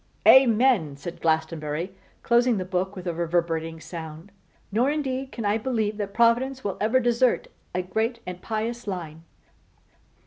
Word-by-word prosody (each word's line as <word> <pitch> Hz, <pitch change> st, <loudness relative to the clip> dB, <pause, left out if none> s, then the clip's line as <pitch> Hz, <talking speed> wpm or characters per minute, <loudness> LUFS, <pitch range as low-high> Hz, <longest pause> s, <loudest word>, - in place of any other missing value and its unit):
'Amen!' 235 Hz, -, +5 dB
said 170 Hz, +4 st, -8 dB
Glastonbury, 160 Hz, +1 st, -1 dB, 0.3 s
closing 240 Hz, -1 st, +3 dB
the 185 Hz, -, -3 dB
book 185 Hz, +1 st, -2 dB
with 185 Hz, -1 st, -8 dB
a 175 Hz, -, -1 dB
reverberating 165 Hz, -1 st, -1 dB
sound. 160 Hz, +2 st, -8 dB, 0.4 s
'Nor 235 Hz, +7 st, +2 dB
indeed 270 Hz, -3 st, -2 dB
can 230 Hz, -, -5 dB
I 205 Hz, +2 st, +2 dB
believe 220 Hz, -3 st, -1 dB
that 205 Hz, -2 st, -3 dB
Providence 245 Hz, +3 st, +2 dB
will 200 Hz, -2 st, -2 dB
ever 225 Hz, +5 st, +3 dB
desert 240 Hz, 0 st, +2 dB, 0.3 s
a 180 Hz, -, 0 dB
great 220 Hz, +6 st, -1 dB
and 180 Hz, 0 st, -7 dB
pious 225 Hz, +1 st, -3 dB
line! 165 Hz, -5 st, -5 dB
205 Hz, 145 wpm, -25 LUFS, 170-235 Hz, 0.4 s, Amen